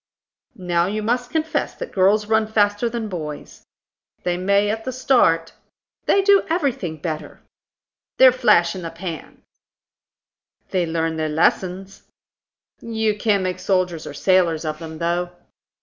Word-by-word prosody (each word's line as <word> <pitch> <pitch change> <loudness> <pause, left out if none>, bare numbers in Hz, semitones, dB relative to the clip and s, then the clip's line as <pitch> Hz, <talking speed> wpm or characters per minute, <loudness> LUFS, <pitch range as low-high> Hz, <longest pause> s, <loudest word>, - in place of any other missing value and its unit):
"Now 175 -3 0
you 210 +2 -3
must 245 +2 -1
confess 320 +3 -2
that - - -7
girls 200 +3 +3
run 220 0 +2
faster 205 +1 +1
than 230 -1 -4
boys." 155 -6 -7 0.6
"They 175 -1 0
may 200 +3 +2
at 220 +1 -4
the 260 - -3
start." 200 -11 +2 0.5
"They 395 - +4
do 400 0 +5
everything 270 - -1
better." 155 -1 -6 0.8
"They're 260 -1 +8
flash 205 -9 +3
in 185 - -7
the 165 - -5
pans." 165 -1 -8 1.3
"They 180 -3 0
learn 160 0 -1
their 155 -1 -1
lessons." 185 +5 -1 0.7
"You 220 -2 -1
can't 205 -2 +1
make 185 -1 -3
soldiers 180 -4 -1
or 145 - -8
sailors 175 -4 +2
of 155 0 -3
them, 160 -1 -8
though." 175 +2 -1
190 Hz, 140 wpm, -21 LUFS, 165-220 Hz, 1.3 s, They're